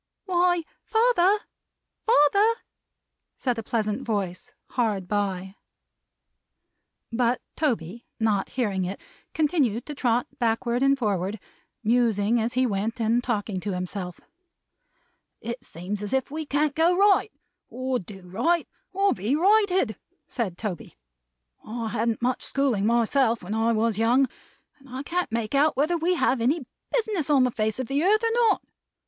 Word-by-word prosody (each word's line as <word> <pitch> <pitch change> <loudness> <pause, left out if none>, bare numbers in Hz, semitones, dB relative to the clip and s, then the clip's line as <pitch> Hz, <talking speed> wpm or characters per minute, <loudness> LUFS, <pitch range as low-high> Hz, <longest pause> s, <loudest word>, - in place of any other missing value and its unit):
"Why, 355 -2 +2 0.2
father, 445 -4 +3 0.7
father!" 405 +4 +5 0.8
said 245 -3 -1
a - - -2
pleasant 215 -2 -1
voice, 205 +1 -3 0.2
hard 210 -7 0
by. 195 -1 -2 1.5
But 240 +1 +1 0.2
Toby, 235 - -2
not 210 -3 +1
hearing 205 -7 -1
it 185 +2 -4 0.4
continued 285 - +1
to 300 - -6
trot 245 -3 +1
backward 235 +1 0
and 275 0 +4
forward: 205 -3 -1 0.4
musing 230 -1 +2
as 230 +2 -1
he 255 +1 +2
went, 220 +2 -2
and 230 +2 +2
talking 210 -5 -2
to 200 +1 -3
himself. 180 -1 -4 1.2
"It 235 +2 -6
seems 195 +1 -6
as 205 +2 -4
if 265 0 0
we 310 0 -4
can't 290 +1 +1
go 335 +3 +3
right, 405 +2 +4 0.4
or 255 0 -2
do 190 0 -11
right, 240 - 0 0.2
or 395 +1 +2
be 210 +9 -1
righted," 375 - +3 0.3
said 200 -8 -3
Toby. 195 -5 -5 0.7
"I 225 0 -4
hadn't 225 +2 -1
much 255 +1 0
schooling, 250 -8 +1
myself, 235 0 +2
when 190 +4 -4
I 225 +1 +2
was 225 -1 +1
young; 245 +4 +4 0.5
and 270 0 -18
I 260 +2 -5
can't 355 0 -2
make 225 0 -2
out 285 0 +3
whether 305 +5 +2
we 345 +2 +1
have 260 -7 +1
any 270 +4 +1 0.3
business 425 - 0
on 280 -3 +5
the 250 - +2
face 215 -1 -1
of 260 - -2
the 275 +5 0
earth, 430 +4 +3
or 455 - +2
not. 460 -2 +3
240 Hz, 145 wpm, -25 LUFS, 215-295 Hz, 1.5 s, father